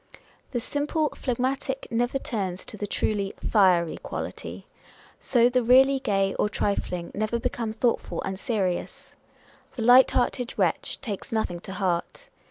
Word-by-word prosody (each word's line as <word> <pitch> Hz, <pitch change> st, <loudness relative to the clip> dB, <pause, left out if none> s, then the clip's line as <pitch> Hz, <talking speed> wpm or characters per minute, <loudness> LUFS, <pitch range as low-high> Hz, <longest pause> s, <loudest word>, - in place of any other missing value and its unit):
The 245 Hz, -, -2 dB
simply 295 Hz, +5 st, -1 dB
phlegmatic 265 Hz, +1 st, -2 dB
never 245 Hz, +3 st, +1 dB
turns 195 Hz, -8 st, -4 dB
to -, -, -8 dB
the 205 Hz, 0 st, -4 dB
truly 200 Hz, -1 st, -1 dB
" -, -, -35 dB
fiery 180 Hz, -6 st, +4 dB
quality." -, -, -6 dB, 0.5 s
So, 240 Hz, -2 st, +3 dB
the 250 Hz, 0 st, +2 dB
really 265 Hz, +3 st, +5 dB
gay 195 Hz, -5 st, +1 dB
or 210 Hz, -, +2 dB
trifling 180 Hz, -4 st, -2 dB
never 215 Hz, +3 st, -1 dB
become 230 Hz, -1 st, -2 dB
thoughtful 230 Hz, +1 st, 0 dB
and 190 Hz, 0 st, -4 dB
serious. 200 Hz, -7 st, -2 dB, 0.6 s
The 235 Hz, -, -3 dB
light 250 Hz, +3 st, +7 dB
hearted 245 Hz, 0 st, -1 dB
wretch -, -, 0 dB
takes 210 Hz, -7 st, -5 dB
nothing 220 Hz, -6 st, -1 dB
to 190 Hz, -, -8 dB
heart. 185 Hz, -, -2 dB
225 Hz, 145 wpm, -26 LUFS, 195-250 Hz, 0.6 s, light